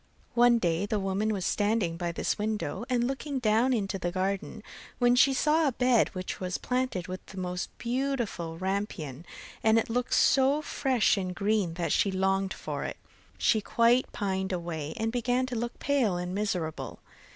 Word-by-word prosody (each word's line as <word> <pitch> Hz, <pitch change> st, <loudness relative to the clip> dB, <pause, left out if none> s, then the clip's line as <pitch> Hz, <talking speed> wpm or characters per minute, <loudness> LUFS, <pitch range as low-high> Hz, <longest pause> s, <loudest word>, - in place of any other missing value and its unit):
One 240 Hz, 0 st, +5 dB
day 175 Hz, -1 st, 0 dB
the 210 Hz, 0 st, 0 dB
woman 195 Hz, +3 st, 0 dB
was 195 Hz, -4 st, -2 dB
standing 205 Hz, -5 st, +1 dB
by 170 Hz, 0 st, -2 dB
this 170 Hz, -, -2 dB
window 210 Hz, -2 st, -2 dB
and 245 Hz, -1 st, +2 dB
looking 270 Hz, +2 st, -3 dB
down 235 Hz, +1 st, +3 dB
into 195 Hz, -5 st, -1 dB
the 175 Hz, 0 st, -2 dB
garden, 190 Hz, +1 st, -2 dB, 0.3 s
when 245 Hz, -1 st, +4 dB
she 270 Hz, +2 st, +6 dB
saw 300 Hz, +4 st, +3 dB
a 270 Hz, -, 0 dB
bed 250 Hz, -2 st, +3 dB
which 185 Hz, 0 st, -4 dB
was 180 Hz, -1 st, -2 dB
planted 250 Hz, -8 st, -2 dB
with 185 Hz, 0 st, -6 dB
the 190 Hz, -, -11 dB
most 180 Hz, 0 st, -3 dB
beautiful 240 Hz, -10 st, -2 dB
rampion 190 Hz, -7 st, -3 dB
(rapunzel), 170 Hz, -, -14 dB
and 220 Hz, 0 st, +5 dB
it 225 Hz, -, 0 dB
looked 245 Hz, +1 st, 0 dB
so 275 Hz, +3 st, +4 dB
fresh 260 Hz, -8 st, +2 dB
and 185 Hz, -2 st, -3 dB
green 200 Hz, -4 st, 0 dB
that 175 Hz, -1 st, -2 dB
she 200 Hz, -, +3 dB
longed 190 Hz, 0 st, 0 dB
for -, -, -4 dB
it, -, -, -5 dB, 0.4 s
she 220 Hz, -, +3 dB
quite 235 Hz, +4 st, +3 dB
pined 190 Hz, -2 st, -2 dB
away, 165 Hz, -4 st, -4 dB
and 225 Hz, 0 st, -1 dB
began 245 Hz, +1 st, +1 dB
to 255 Hz, -1 st, -5 dB
look 235 Hz, +1 st, -3 dB
pale 255 Hz, -10 st, +1 dB
and 180 Hz, +1 st, -4 dB
miserable. 185 Hz, -6 st, -3 dB
210 Hz, 180 wpm, -29 LUFS, 185-245 Hz, 0.4 s, she